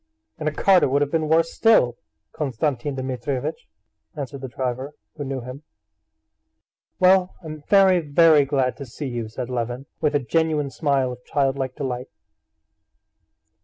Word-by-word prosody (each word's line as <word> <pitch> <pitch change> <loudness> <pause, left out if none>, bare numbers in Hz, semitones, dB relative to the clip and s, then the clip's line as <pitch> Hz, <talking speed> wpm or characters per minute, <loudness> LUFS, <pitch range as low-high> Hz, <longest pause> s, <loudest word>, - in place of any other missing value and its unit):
"In 155 - -3
a - - +2
cart 185 +4 +4
it - - +3
would 140 +2 +2
have 145 - -4
been 160 -2 0
worse 165 +1 +3
still, 215 - +4 0.4
Konstantin 140 -1 -2
Dmitrievitch," 130 - -4 0.5
answered 140 -2 -6
the 135 - -5
driver, 130 +3 -4 0.2
who 145 - -5
knew 135 -1 -4
him. 125 +4 -9 1.4
"Well, 185 0 +4
I'm 155 -1 -8
very, 190 -2 +6
very 155 -1 +5
glad 135 -2 0
to 140 - -7
see 140 +5 -6
you," 120 -3 -4
said 125 +2 -6
Levin, 120 +2 -3
with 150 -1 +1
a - - +4
genuine 150 +1 0
smile 135 -2 0
of 125 0 -10
childlike 135 -2 -1
delight. 125 -2 -4
140 Hz, 150 wpm, -23 LUFS, 130-155 Hz, 1.4 s, very